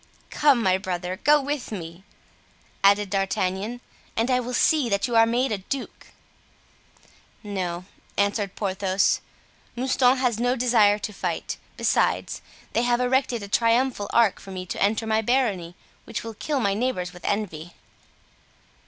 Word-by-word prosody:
"Come 280 -6 +3
my 190 -1 +3
brother, 185 -1 -3
go 295 +2 +6
with 285 -3 -4
me," 170 -2 -7 0.8
added 200 0 +4
D'Artagnan, 195 +3 -1 0.4
"and 230 +3 +1
I 250 - +3
will 250 0 -4
see 295 -3 +3
that 200 -1 +1
you 240 - -2
are 225 0 +6
made 245 +2 +1
a 210 - -1
duke!" 265 +8 -6 1.4
"No," 185 -4 -4 0.3
answered 200 -1 0
Porthos, 195 -1 +1 0.5
"Mouston 255 +1 +3
has 245 -4 0
no 245 +1 +2
desire 230 -5 +4
to 210 0 -5
fight; - - -3 0.2
besides, - - +1 0.3
they - - +2
have 240 0 +2
erected 250 -2 +1
a - - -6
triumphal 230 0 +1
arch 230 -4 +3
for 195 - -12
me 185 -1 -6
to - - -5
enter 215 +3 +2
my 220 0 +1
barony, 210 -8 0 0.3
which 210 - -5
will 225 0 -6
kill 285 +6 -2
my 200 -5 +1
neighbors 200 -5 -2
with 180 - -13
envy." 175 -5 -3
215 Hz, 150 wpm, -25 LUFS, 195-245 Hz, 1.4 s, go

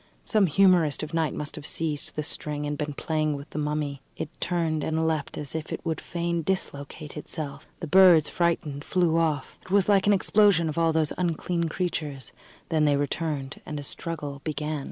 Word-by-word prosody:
Some 210 -4 +3
humorist 175 -4 +4
of 155 - -6
night 165 -2 0
must 150 0 -3
have 150 - -8
seized 155 -3 -2
the 150 - -1
string 150 -1 -3
and 145 0 -2
been 150 -1 -3
playing 155 -1 0
with 140 0 -9
the 150 - -3
mummy. 150 -2 -2 0.2
It 150 - -4
turned 165 -3 0
and 160 0 0
leapt 155 -3 -2
as 145 - -6
if 160 -1 -4
it - - -5
would 160 -2 -1
fain 170 0 -2
dislocate 150 -4 -3
itself; 150 -1 -6
the - - -2
birds, 170 -2 +7
frightened, 160 -5 -1
flew 170 -2 +2
off. 155 -4 0
It - - -17
was 195 -1 +3
like 200 -1 +4
an 205 - +6
explosion 200 -3 +4
of 155 - -5
all 165 -1 +3
those 160 -2 +1
unclean 170 0 0
creatures. 155 -6 -3 0.4
Then 155 -2 +3
they 145 -1 +3
returned, 145 -1 -2
and 150 -1 -5
a - - -6
struggle 145 -2 -5
began. 150 0 -2
155 Hz, 195 wpm, -26 LUFS, 150-170 Hz, 0.4 s, birds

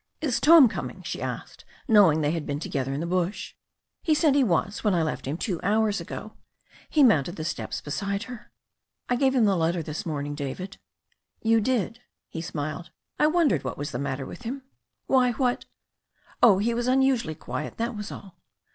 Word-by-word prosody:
'Is 280 -6 0
Tom 315 -3 +8
coming?" 220 - -6
she - - -5
asked, - - -6 0.2
knowing 195 - +5
they 145 0 +1
had 165 -2 -2
been 145 0 -2
to - - -4
gether 135 -1 -2
in 140 +2 -2
the - - -2
bush. 180 +3 -2 0.5
'*He 315 -3 +3
said 300 -2 +3
he 280 -1 +4
was 200 -1 0
when 205 -4 +2
I 165 - +2
left 155 -4 -3
him 145 +4 -2
two 180 -4 -2
hours 210 +1 +1
ago." - - -7 0.6
He 300 - +4
mounted 175 - +3
the 155 - -5
steps 170 - -4
beside 200 +7 -3
her. 240 -4 -10 0.6
"I 245 - +3
gave 265 +1 +2
him 240 -4 +4
the 200 -2 +3
letter 170 0 0
this 155 0 -5
morning, 145 -3 -3
David." 145 +7 -5 0.7
"You 225 0 +4
did," 235 0 -1 0.3
he 165 - -5
smiled. 155 0 -5 0.3
'T 300 - +5
wondered 310 - +2
what - - -4
was 145 0 -4
the - - -4
matter 135 -1 -3
with - - -9
him." 255 +3 -5 0.4
"Why, 255 -2 +3
what 250 -1 0 0.4
" - - -31
"Oh, 215 -6 +7
he 225 +4 +1
was 240 +1 -1
unusually 255 -10 +2
quiet, 130 -4 -6
that 230 +1 -2
was 210 -1 -6
all." 195 -3 -11
200 Hz, 200 wpm, -26 LUFS, 160-245 Hz, 0.7 s, Tom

